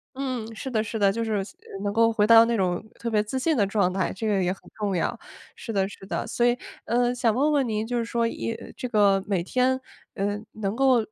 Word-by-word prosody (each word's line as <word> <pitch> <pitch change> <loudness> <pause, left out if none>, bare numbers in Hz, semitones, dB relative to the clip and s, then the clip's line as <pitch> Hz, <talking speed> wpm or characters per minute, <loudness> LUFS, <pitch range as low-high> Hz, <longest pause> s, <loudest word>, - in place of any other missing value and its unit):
嗯， 250 -5 -4
是 265 - -6
的 220 -4 0
是 220 0 -4
的， 200 -1 +5
就 230 +2 -2
是 215 -2 0 0.4
能 205 0 -1
够 230 0 +4
回 210 -1 +2
到 230 0 +9
那 230 -1 +1
种 180 0 0 0.2
特 235 - -3
别 210 -1 +2
自 260 +5 -3
信 320 +3 +1
的 205 -4 +3
状 195 -2 +1
态， 190 -2 0
这 215 +4 -4
个 195 -3 +2
也 180 - +1
很 190 - -7
重 205 -3 -1
要。 170 - -1 0.4
是 230 - -6
的 195 -2 +1
是 195 -1 -11
的， - - -3
所 240 - +1
以， 245 0 +3 0.3
呃， 245 +1 +1
想 235 -3 +2
问 290 +5 +2
问 275 -3 +3
您 215 0 -2
就 245 - -1
是 235 - 0
说， 230 0 0
一 230 - -3 0.2
这 250 - -5
个 200 -4 +3
每 195 -4 0
天， 255 +7 +1 0.4
呃， 205 +1 -1 0.2
能 205 -1 -3
够 265 0 +4
225 Hz, 260 characters per minute, -25 LUFS, 200-240 Hz, 0.4 s, 到